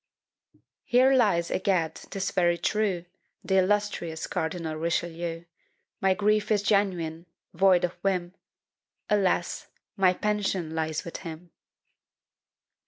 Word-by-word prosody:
Here 255 +2 +4
lies, 205 -10 +2
egad, 180 -5 +1
'tis 195 +3 -5
very 175 -2 +2
true, 190 -1 0 0.4
The 190 -1 +3
illustrious 190 -4 0
Cardinal 160 -1 -3
Richelieu: 170 +1 -2 0.6
My 190 -1 +3
grief 210 +1 +1
is 210 -2 +2
genuine 180 -5 0 0.3
void 185 0 +4
of 175 - +1
whim! 180 -2 -1 0.8
Alas! 190 -4 +1 0.3
my 190 -3 +4
pension 195 -6 -1
lies 160 -2 -2
with 170 - -6
him! 170 0 -9
180 Hz, 105 wpm, -27 LUFS, 170-200 Hz, 0.8 s, Here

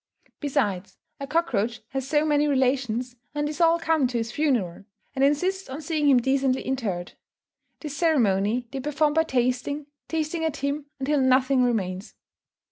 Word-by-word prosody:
Besides, 205 - -1 0.2
a 275 - -5
cockroach 240 -8 0
has 270 -1 -4
so 295 +1 +2
many 295 -1 +2
relations, 255 -3 0 0.2
and 295 0 0
these 305 +3 -4
all 335 0 +5
come 320 -5 +2
to 245 -1 -3
his 230 0 -2
funeral, 235 - -1 0.3
and 270 - 0
insist 360 +7 +1
on 265 +3 -5
seeing 305 -1 0
him 265 - +6
decently 265 +1 +1
interred. 210 -10 -3 0.7
This 295 -3 -6
ceremony 235 - +2
they 275 - -4
perform 295 +2 +1
by 320 +1 +3
tasting, 255 +2 -1 0.2
tasting 320 +1 -2
at 320 -3 -1
him 280 +1 -3
until 280 +1 +1
nothing 260 0 +3
remains. 200 -5 -1
270 Hz, 155 wpm, -25 LUFS, 245-300 Hz, 0.7 s, him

